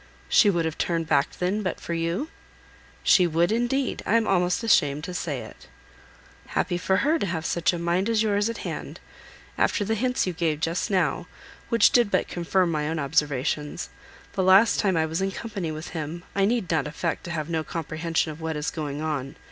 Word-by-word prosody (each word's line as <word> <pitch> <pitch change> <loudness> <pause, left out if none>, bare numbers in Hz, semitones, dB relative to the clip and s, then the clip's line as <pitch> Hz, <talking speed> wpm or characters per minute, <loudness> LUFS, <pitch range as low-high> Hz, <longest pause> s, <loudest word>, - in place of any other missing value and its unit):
"She 205 - +6
would 170 -4 +1
have 160 -1 -4
turned 165 -1 0
back 145 -1 +2
then, 185 +4 0
but 185 -3 -3
for 170 - -5
you?" 170 - -1 0.7
"She 180 -2 +5
would 170 +3 +2
indeed. 240 +3 0
I 220 - +1
am 230 -1 +3
almost 180 +2 +1
ashamed 150 -9 +3
to 180 +1 -5
say - - -3
it." - - -12 0.8
"Happy 175 -2 -1
for 190 +1 +1
her, 320 +3 +3
to - - 0
have 165 -2 -3
such 170 0 +1
a 175 - -3
mind 170 +5 0
as 225 -1 +2
yours 205 0 +1
at 230 - -6
hand! - - -5 0.6
After 205 - +2
the 220 - 0
hints 250 +3 0
you 180 - -2
gave 160 -3 -1
just 165 +2 -1
now, 180 -5 0 0.4
which 230 - +5
did 240 -4 +4
but - - +1
confirm 175 0 0
my 150 -1 -1
own 160 - -2
observations, 145 0 -1 0.4
the - - 0
last 190 +4 +5
time 190 -4 +2
I 160 - +2
was 160 +3 -2
in 195 - +1
company 195 -4 -5
with 155 +2 -6
him, 165 +1 -5
I 195 0 +2
need 220 -5 0
not 160 -2 +1
affect 160 +2 -3
to 175 - -5
have 155 -2 -3
no 160 -2 -1
comprehension 160 0 -2
of 155 +2 -10
what 160 0 -2
is 150 - -2
going 150 -2 -4
on. 140 -4 -3
170 Hz, 205 wpm, -25 LUFS, 160-200 Hz, 0.8 s, She